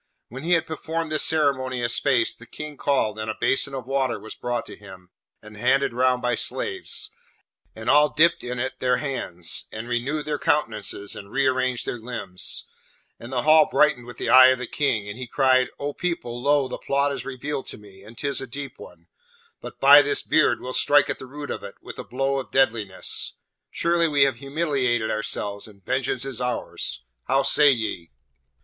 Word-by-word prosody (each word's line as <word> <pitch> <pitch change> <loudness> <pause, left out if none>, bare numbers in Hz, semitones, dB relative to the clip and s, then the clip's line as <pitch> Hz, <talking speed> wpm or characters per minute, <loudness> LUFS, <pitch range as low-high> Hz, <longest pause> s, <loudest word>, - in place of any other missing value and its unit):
When 130 +4 -8
he 170 +4 +1
had 165 - +3
performed 160 0 -4
this 155 - 0
ceremony 130 -5 +1
a - - +2
space, 120 - +2
the - - -14
King 150 -1 -8
called, 120 -7 0
and 110 0 -4
a 110 - -4
basin 135 +1 +1
of 130 -3 -5
water 130 -4 -1
was 110 +2 -9
brought 120 -1 -3
to - - -10
him, 95 -3 -14 0.3
and 110 0 -12
handed 130 +4 +2
round 125 0 +2
by 125 0 +1
slaves, 365 - -2 0.6
and - - -8
all 150 +1 +5
dipped 165 +3 +3
in 125 0 -4
it 130 +2 -3
their 125 -1 +2
hands, 90 - -3
and 110 +2 -6
renewed 130 +6 -2
their 150 -1 -2
countenances 110 -10 -1
and 100 - -10
re 140 0 +1
arranged 130 -1 0
their 120 - -4
limbs; 110 -6 -4 0.5
and 120 - -10
the 125 -2 -1
Hall 155 0 +6
brightened 135 -5 +2
with 120 -1 -10
the - - -3
eye 130 0 +9
of 130 0 +3
the 125 - -4
King, 115 -7 -1
and 100 +4 -7
he 130 - -5
cried, 130 0 +3
'O 145 0 -4
people, 125 -10 -3
lo, 140 0 +2
the - - -6
plot 140 +1 +1
is 135 -3 -4
revealed 135 +1 -5
to - - -8
me, 100 -2 -16
and 110 +3 -14
'tis 140 -2 -1
a 135 - -6
deep 140 +3 -7
one; - - -13 0.6
but, - - -10
by - - +9
this 420 -1 0
beard, - - +2
we'll 130 0 -6
strike 145 +1 +4
at - - -5
the 130 - -9
root 145 +2 -7
of - - -4
it, 100 - -9
and - - -10
a - - -4
blow 135 +2 -1
of 130 - -7
deadliness. 110 -8 0 0.3
Surely 170 0 +1
we 145 -3 +4
have 135 -3 +1
humiliated 135 -5 -1
ourselves, 105 -1 -3
and 100 -4 -18
vengeance 130 0 -1
is 135 -3 -5
ours! 125 - -3 0.2
How 135 +1 +2
say 145 +2 +5
ye?' 110 -9 -3
130 Hz, 200 wpm, -24 LUFS, 120-145 Hz, 0.6 s, eye